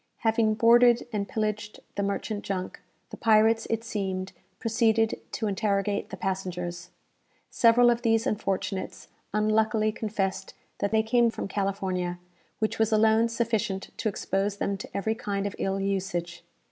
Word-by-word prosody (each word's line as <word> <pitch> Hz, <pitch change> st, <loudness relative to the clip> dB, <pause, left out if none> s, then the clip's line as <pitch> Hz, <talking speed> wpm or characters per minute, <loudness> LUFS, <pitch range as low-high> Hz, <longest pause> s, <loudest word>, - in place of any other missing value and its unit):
Having 225 Hz, -1 st, +2 dB
boarded 235 Hz, +1 st, +5 dB
and 200 Hz, -2 st, -2 dB
pillaged 215 Hz, -1 st, -3 dB
the 200 Hz, -, -2 dB
merchant 205 Hz, +1 st, -2 dB
junk, 185 Hz, -2 st, -4 dB, 0.3 s
the -, -, -7 dB
pirates, 225 Hz, 0 st, +4 dB
it 225 Hz, 0 st, -1 dB
seemed, 190 Hz, -4 st, -3 dB, 0.2 s
proceeded 225 Hz, -1 st, +1 dB
to 225 Hz, -, -2 dB
interrogate 200 Hz, 0 st, 0 dB
the 195 Hz, -, -7 dB
passengers. 180 Hz, -2 st, -4 dB, 0.6 s
Several 240 Hz, +1 st, +5 dB
of 235 Hz, 0 st, -1 dB
these 225 Hz, -1 st, +2 dB
unfortunates 195 Hz, -2 st, -3 dB, 0.2 s
unluckily 215 Hz, +1 st, +2 dB
confessed 210 Hz, -3 st, -3 dB, 0.2 s
that 200 Hz, -, 0 dB
they 220 Hz, 0 st, +3 dB
came 235 Hz, +1 st, +3 dB
from 225 Hz, -, -5 dB
California, 190 Hz, -3 st, -2 dB, 0.4 s
which 215 Hz, 0 st, -2 dB
was 220 Hz, 0 st, +2 dB
alone 220 Hz, +1 st, +4 dB
sufficient 225 Hz, -4 st, -1 dB
to 225 Hz, -, 0 dB
expose 195 Hz, 0 st, -1 dB
them 200 Hz, 0 st, -1 dB
to 195 Hz, -, -8 dB
every 210 Hz, +3 st, 0 dB
kind 200 Hz, -3 st, -3 dB
of 200 Hz, -, -3 dB
ill 195 Hz, 0 st, -1 dB
usage. 185 Hz, -3 st, -2 dB
210 Hz, 145 wpm, -27 LUFS, 195-225 Hz, 0.6 s, boarded